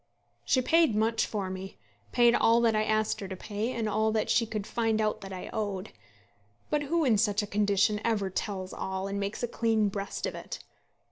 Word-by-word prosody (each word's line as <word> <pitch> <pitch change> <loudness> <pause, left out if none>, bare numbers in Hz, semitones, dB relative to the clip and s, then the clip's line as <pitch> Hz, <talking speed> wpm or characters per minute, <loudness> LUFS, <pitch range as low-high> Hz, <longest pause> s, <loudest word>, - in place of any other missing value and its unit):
She 255 - +2
paid 325 -5 +4
much 225 +2 +1
for 195 -3 -3
me, 190 +1 -7 0.3
paid 240 -1 +5
all 230 0 +4
that 230 -2 +3
I 215 - +2
asked 215 0 +1
her 195 - -5
to 190 - -5
pay, 210 +5 -3
and 230 -3 -2
all 215 +1 +1
that 220 - 0
she 230 - +3
could 210 -2 -4
find 225 -1 0
out 215 -1 0
that 195 -1 -8
I 185 -1 -6
owed. 205 -2 -3 0.8
But 295 - +2
who 320 +2 +1
in 225 -6 +4
such 210 -1 +2
a - - -2
condition 205 0 +2
ever 205 -4 0
tells 190 -1 -4
all 190 0 -3
and 200 0 -3
makes 200 +4 -3
a - - +1
clean 225 -3 +1
breast 200 0 -4
of - - -3
it? - - -7
215 Hz, 210 wpm, -29 LUFS, 200-225 Hz, 0.8 s, paid